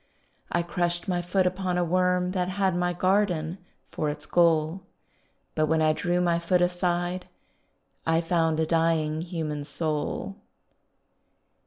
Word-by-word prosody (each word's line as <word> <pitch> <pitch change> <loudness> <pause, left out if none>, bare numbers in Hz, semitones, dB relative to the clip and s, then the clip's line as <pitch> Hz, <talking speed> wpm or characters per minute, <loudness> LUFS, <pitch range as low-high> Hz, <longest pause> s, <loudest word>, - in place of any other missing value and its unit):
I 175 - +1
crushed 175 +1 -1
my 180 -2 0
foot 185 +2 +1
upon 180 0 -1
a 180 - +2
worm 180 +1 +1
That 180 -1 -1
had 190 -1 0
my 175 0 +1
garden 180 -2 +1 0.3
for 150 - -1
its 150 0 -6
goal, 165 +1 +2 0.7
But 155 0 +1
when 160 +1 +2
I 155 0 +3
drew 175 +2 0
my 170 -1 +2
foot 175 +2 +2
aside 175 0 -1 0.8
I 165 0 +2
found 165 -1 +1
a 160 - +2
dying 160 -1 +1
human 160 -4 -4
soul. 155 +6 -3
175 Hz, 140 wpm, -26 LUFS, 160-180 Hz, 0.8 s, I